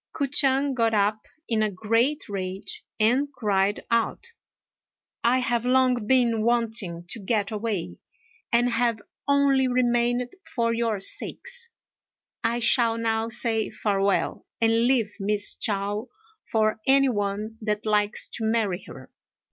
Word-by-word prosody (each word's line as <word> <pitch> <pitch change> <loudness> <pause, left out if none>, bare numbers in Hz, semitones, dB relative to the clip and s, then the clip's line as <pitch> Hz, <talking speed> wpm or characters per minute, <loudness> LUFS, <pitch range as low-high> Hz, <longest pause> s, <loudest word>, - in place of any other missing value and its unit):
K'o 285 - -1
ch'ang 275 0 +3
got 230 -3 +1
up 210 +1 0 0.2
in 225 -2 0
a 215 - +1
great 230 - 0
rage 190 -1 -6 0.2
and 255 +7 +2
cried 205 -5 0
out, 230 - -1 0.9
"I 240 +2 +3
have 240 -2 0
long 250 -3 +2
been 240 -3 +3
wanting 225 -7 0
to 230 - -1
get 205 0 -1
away, 205 - -3 0.5
and 240 +1 +3
have 230 -1 +1 0.3
only 280 -2 +3
remained 245 0 +1 0.2
for 230 -2 +1
your 230 -3 -1
sakes. 480 - -2 0.7
I 230 +1 +1
shall 235 -1 +3
now 225 0 -1
say 230 -2 0
farewell, 200 -1 -1
and 230 +1 +3
leave 230 -6 +1
Miss 205 +1 0
Chao 205 +2 -2 0.4
for 215 0 +1
any 275 0 +5
one 210 0 -3
that 210 0 -2
likes 210 -1 +3
to 225 - -5
marry 220 -5 0
her." 130 -1 -12
230 Hz, 130 wpm, -25 LUFS, 210-245 Hz, 0.9 s, any